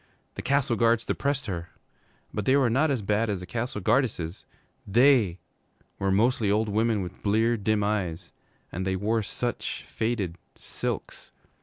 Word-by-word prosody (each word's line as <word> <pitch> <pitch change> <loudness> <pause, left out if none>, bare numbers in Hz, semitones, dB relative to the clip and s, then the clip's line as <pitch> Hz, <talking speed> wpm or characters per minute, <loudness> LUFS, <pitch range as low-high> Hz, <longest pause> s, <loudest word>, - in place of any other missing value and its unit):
The - - -6
Castle 140 -3 +1
Guards 115 -1 +3
depressed 140 0 -1
her. 90 -5 -4 0.6
But 105 -2 -2
they 130 - +4
were 130 -4 +3
not 145 +6 +3
as 130 -7 0
bad 105 +3 +1
as 100 -3 -1
the 90 - -7
Castle 115 +1 -3
Guardesses. 105 - 0 0.4
They 115 -4 +4 0.6
were 95 0 +1
mostly 110 +1 +2
old 105 +2 +2
women 110 -1 +1
with 90 - -9
bleared, 110 +1 +1
dim 110 0 +2
eyes, 95 -6 -2 0.4
and 95 - -3
they 95 0 0
wore 110 +4 +1
such 120 +3 -4
faded 105 -7 -2 0.2
silks. - - -5
110 Hz, 155 wpm, -27 LUFS, 95-120 Hz, 0.6 s, they